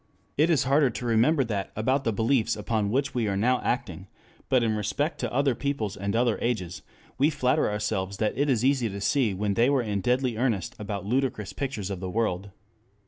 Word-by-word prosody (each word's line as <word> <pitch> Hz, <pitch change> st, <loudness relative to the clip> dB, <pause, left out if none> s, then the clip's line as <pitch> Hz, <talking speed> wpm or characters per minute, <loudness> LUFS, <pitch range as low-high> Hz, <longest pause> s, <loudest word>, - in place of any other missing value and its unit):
It 155 Hz, +4 st, +3 dB
is 150 Hz, -6 st, +3 dB
harder 140 Hz, +1 st, +3 dB
to 120 Hz, +1 st, -6 dB
remember 120 Hz, +6 st, +3 dB
that 105 Hz, -5 st, -3 dB
about 130 Hz, +6 st, 0 dB
the 115 Hz, -, +2 dB
beliefs 115 Hz, +2 st, +1 dB
upon 105 Hz, 0 st, -1 dB
which 135 Hz, +5 st, 0 dB
we 120 Hz, -3 st, 0 dB
are 100 Hz, -1 st, -1 dB
now 125 Hz, +5 st, +2 dB
acting, 95 Hz, -7 st, -3 dB, 0.4 s
but 130 Hz, -2 st, +3 dB
in 110 Hz, -2 st, +1 dB
respect 145 Hz, -, -2 dB
to 120 Hz, -, -2 dB
other 140 Hz, +1 st, +2 dB
peoples 120 Hz, -6 st, -2 dB
and 100 Hz, +2 st, -3 dB
other 120 Hz, -1 st, +2 dB
ages 95 Hz, -7 st, -2 dB, 0.4 s
we 145 Hz, +3 st, +4 dB
flatter 135 Hz, -4 st, +1 dB
ourselves 100 Hz, -2 st, -2 dB
that 110 Hz, 0 st, 0 dB
it 145 Hz, +4 st, +1 dB
is 125 Hz, -2 st, +2 dB
easy 130 Hz, -4 st, +2 dB
to 100 Hz, 0 st, -6 dB
see 105 Hz, +1 st, +1 dB
when 100 Hz, +1 st, -1 dB
they 120 Hz, +5 st, +3 dB
were 135 Hz, -3 st, +2 dB
in 105 Hz, -3 st, -2 dB
deadly 125 Hz, +1 st, 0 dB
earnest 115 Hz, -7 st, -1 dB
about 100 Hz, -2 st, -4 dB
ludicrous 115 Hz, -3 st, -1 dB
pictures 125 Hz, -9 st, -4 dB
of 95 Hz, -, -4 dB
the 95 Hz, 0 st, -4 dB
world. 100 Hz, -2 st, -1 dB
115 Hz, 205 wpm, -26 LUFS, 100-130 Hz, 0.4 s, we